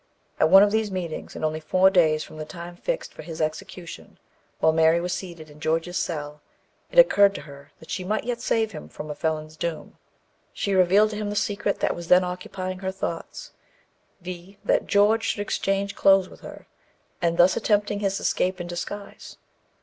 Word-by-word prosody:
At 155 - +4
one 195 +3 +9
of 205 - +3
these 220 -1 +1
meetings, 180 -4 -5
and - - -2
only 155 0 -1
four 185 +5 +3
days 155 -5 +3
from - - -12
the 155 - -4
time 170 +2 -9
fixed - - -4
for - - -10
the 160 0 -4
execution, 170 +2 -9 0.4
while 160 - +4
Mary 160 +1 +4
was 175 +1 -2
seated 170 -4 -7
in 150 0 -16
George's 165 +3 -1
cell, 150 -3 -4 0.5
it - - -8
occurred 200 - +6
to - - -5
her 140 -1 -13
that 160 - -12
she 185 - -3
might 210 +4 -1
yet 240 0 -3
save 225 -2 0
him 75 - -9
from 150 - -7
a - - -3
felon's 155 0 -3
doom. 165 0 -5 0.5
She 200 - -2
revealed 190 +4 +4
to 210 - -5
him 210 -1 -3
the 205 - -4
secret 205 0 -1
that - - +1
was 170 -1 -8
then 180 +1 +6
occupying 185 +1 -5
her 190 0 -3
thoughts, 190 - -6 0.7
viz. 180 +2 -8
that - - +2
George 210 +3 +3
should 205 - -1
exchange 200 0 -1
clothes 195 -1 +4
with - - -15
her, - - -11 0.6
and 170 -1 +1
thus 180 +2 +5
attempt 210 -2 +1
his 200 -1 -1
escape 185 +1 0
in 175 - -4
disguise. 185 +4 -7
180 Hz, 195 wpm, -25 LUFS, 160-200 Hz, 0.7 s, one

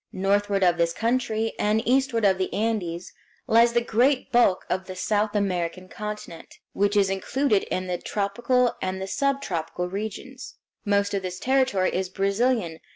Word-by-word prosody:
Northward 200 +1 +1
of 175 -1 +3
this 170 0 +2
country, 225 -1 0
and 215 +2 +1
eastward 255 -3 +2
of 190 -1 +3
the 185 - -1
Andes, 195 -6 -2 0.3
lies 235 +1 +4
the 235 - +3
great 250 +4 +1
bulk 235 -6 +3
of 190 0 -2
the 185 - -7
South 210 +2 0
American 185 -2 -1
continent, 210 -5 -8 0.2
which 205 +1 +1
is 195 -1 +3
included 210 +3 +1
in 185 - -3
the 180 -1 -3
tropical 240 +5 0
and 190 0 -2
the 190 - -3
subtropical 185 - -2
regions. 220 +6 -6 0.3
Most 200 -1 +1
of 200 - 0
this 180 -1 -5
territory 260 -8 +1
is 185 0 -1
Brazilian. 200 -2 0
205 Hz, 155 wpm, -25 LUFS, 185-235 Hz, 0.3 s, lies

